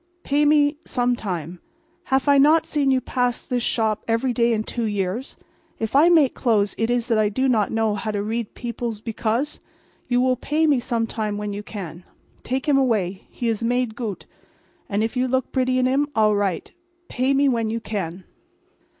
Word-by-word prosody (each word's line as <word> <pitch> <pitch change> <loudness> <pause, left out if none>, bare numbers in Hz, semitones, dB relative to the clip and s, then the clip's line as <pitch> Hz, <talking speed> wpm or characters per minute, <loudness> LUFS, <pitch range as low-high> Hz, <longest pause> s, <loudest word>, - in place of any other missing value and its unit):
Pay 290 +1 +2
me 295 0 +4
some 245 -1 0
time. 175 -6 -5 0.5
Haf 265 +1 +1
I 280 -1 +6
not 310 +4 +5
seen 285 -3 0
you 260 -1 +3
pass 250 -1 -2
mine 250 - +2
shop 220 -2 0
every 235 +3 +1
day 235 0 +2
in 215 -1 0
two 235 +1 -3
years? 205 +4 -2 0.4
If 225 +2 -3
I 310 +5 +6
make 315 -7 +4
clothes 210 -5 +1
is 240 +1 0
it - - -14
that 225 - +3
I 210 -1 +3
do 260 +6 0
not 220 -5 +2
know 225 -1 +1
how 210 +2 -4
to 205 -1 -1
read 225 +1 -3
beoples 235 -2 -4
because? 235 +5 -2 0.5
You 245 0 +2
will 255 0 +2
pay 305 +5 0
me 290 -4 +3
some 235 -1 -1
time 215 -2 -3
when 210 0 -4
you 205 - -4
can. 185 -5 -8 0.4
Take 260 +4 -3
him 280 -2 +4
away. 205 -8 0
He 240 - -4
is 225 -1 0
made 240 -1 0
goot; 225 -6 -5 0.6
and 205 0 0
if 225 +3 -2
you 255 +1 +1
look 260 0 -1
bretty 255 -1 +1
in 255 - +2
him 275 +3 +2
all 215 -1 +4
right. 200 -3 -1
So. - - -21 0.4
Pay 265 +2 +1
me 280 +1 +3
when 230 -4 +1
you 230 +1 -2
can." 190 -5 -5
235 Hz, 200 wpm, -23 LUFS, 215-260 Hz, 0.6 s, I